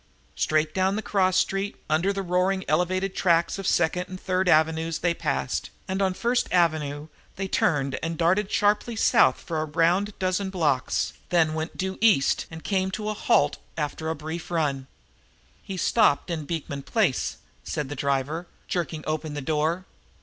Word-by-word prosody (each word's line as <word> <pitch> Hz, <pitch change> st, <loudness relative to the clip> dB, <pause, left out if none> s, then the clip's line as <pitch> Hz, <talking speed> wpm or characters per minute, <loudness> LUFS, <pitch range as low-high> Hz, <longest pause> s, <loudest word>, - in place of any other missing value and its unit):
Straight 155 Hz, 0 st, +1 dB
down 190 Hz, +1 st, +1 dB
the 215 Hz, -, -3 dB
cross 185 Hz, -2 st, +2 dB
street, 195 Hz, +2 st, 0 dB
under 170 Hz, +6 st, +2 dB
the 195 Hz, -1 st, -3 dB
roaring 185 Hz, +1 st, +1 dB
elevated 185 Hz, +5 st, 0 dB
tracks 170 Hz, +1 st, +2 dB
of 195 Hz, -, -3 dB
Second 175 Hz, +2 st, +1 dB
and 185 Hz, 0 st, -7 dB
Third 185 Hz, 0 st, 0 dB
Avenues, 160 Hz, 0 st, +3 dB
they 175 Hz, 0 st, +1 dB
passed, -, -, -2 dB, 0.2 s
and 190 Hz, 0 st, -2 dB
on 190 Hz, -1 st, +1 dB
First 240 Hz, +4 st, +1 dB
Avenue 155 Hz, -4 st, +1 dB, 0.3 s
they 195 Hz, 0 st, -3 dB
turned 140 Hz, -7 st, +1 dB
and 165 Hz, 0 st, -3 dB
darted 185 Hz, +5 st, +2 dB
sharply 210 Hz, +3 st, +2 dB
south -, -, +4 dB
for 160 Hz, -2 st, -3 dB
a -, -, -1 dB
round 175 Hz, +6 st, +1 dB
dozen 185 Hz, +1 st, 0 dB
blocks, 150 Hz, -9 st, 0 dB, 0.2 s
then 165 Hz, -3 st, +3 dB
went 160 Hz, +1 st, -4 dB
due 190 Hz, 0 st, -3 dB
east 210 Hz, -12 st, +3 dB
and 160 Hz, 0 st, -9 dB
came, 190 Hz, -2 st, 0 dB
to 210 Hz, +3 st, -4 dB
a -, -, -1 dB
halt 145 Hz, -7 st, +2 dB, 0.2 s
after 160 Hz, +1 st, -3 dB
a 160 Hz, -, -1 dB
brief 160 Hz, +2 st, -6 dB
run. 145 Hz, -6 st, -1 dB, 0.7 s
"He's 190 Hz, -3 st, -4 dB
stopped 145 Hz, +5 st, +3 dB
in 160 Hz, -3 st, -3 dB
Beekman 145 Hz, -3 st, -4 dB
Place," 185 Hz, -, 0 dB, 0.3 s
said 150 Hz, -3 st, -3 dB
the 145 Hz, -, -5 dB
driver, 140 Hz, +5 st, -1 dB, 0.2 s
jerking 165 Hz, -3 st, -2 dB
open 155 Hz, -1 st, -3 dB
the -, -, -2 dB
door. 160 Hz, +5 st, 0 dB
170 Hz, 170 wpm, -25 LUFS, 155-190 Hz, 0.7 s, south